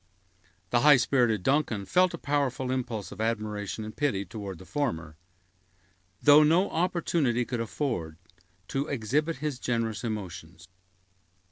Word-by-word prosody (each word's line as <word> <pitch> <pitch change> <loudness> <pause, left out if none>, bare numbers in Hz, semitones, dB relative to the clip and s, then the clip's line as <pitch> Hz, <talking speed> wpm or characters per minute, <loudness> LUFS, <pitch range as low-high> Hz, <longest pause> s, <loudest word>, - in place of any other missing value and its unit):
The 120 - +4
high 145 +1 +7
spirited 120 -5 +2
Duncan 130 -7 +1
felt 180 - +3
a - - -8
powerful 140 -4 -1
impulse 120 -5 -3
of - - -7
admiration 110 -2 -2
and 110 0 -8
pity 105 -10 0
toward 100 -1 -7
the 95 - -13
former, 80 - -3 1.1
though 145 +1 +8
no 165 +6 +3
opportunity 165 -8 0
could 120 -1 -3
offer 115 - -3 0.5
to 135 +2 -1
exhibit 145 +6 0
his 145 -2 -4
generous 115 -5 -2
emotions. 90 -6 -6
120 Hz, 130 wpm, -28 LUFS, 105-145 Hz, 1.1 s, though